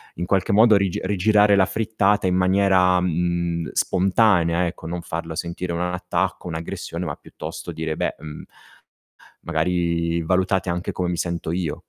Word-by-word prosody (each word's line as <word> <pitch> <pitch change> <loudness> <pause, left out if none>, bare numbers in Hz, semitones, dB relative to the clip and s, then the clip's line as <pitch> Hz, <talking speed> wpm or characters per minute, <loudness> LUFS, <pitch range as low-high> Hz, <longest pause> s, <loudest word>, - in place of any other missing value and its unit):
in 90 - -3
qualche 95 0 +1
modo 110 +1 +6
rige 100 -3 0
rigirare 105 +1 +3
la 95 -1 +4
frittata 105 -3 +1
in 90 - +1
maniera, 95 -1 +3
mh 90 - -1
mhmm, 85 0 -1
spontanea, 90 -3 +2
ecco, 85 -1 -6
non 85 0 -4
farla 80 -1 -5
sentire 85 +1 -4
un 85 - -2
attacco, 90 0 -2
un'aggressione, 85 +1 -5
ma 75 -1 -4
piuttosto 85 +2 -8
dire: 80 -1 -3
"Beh, - - -2
mhmm" 75 0 -9 1.0
"magari 85 0 0
valutate 95 +2 0
anche 90 +1 -2
come 90 -1 -2
mi 85 - -2
sento 85 -2 -3
io". 85 -4 -2
90 Hz, 155 wpm, -22 LUFS, 85-95 Hz, 1.0 s, modo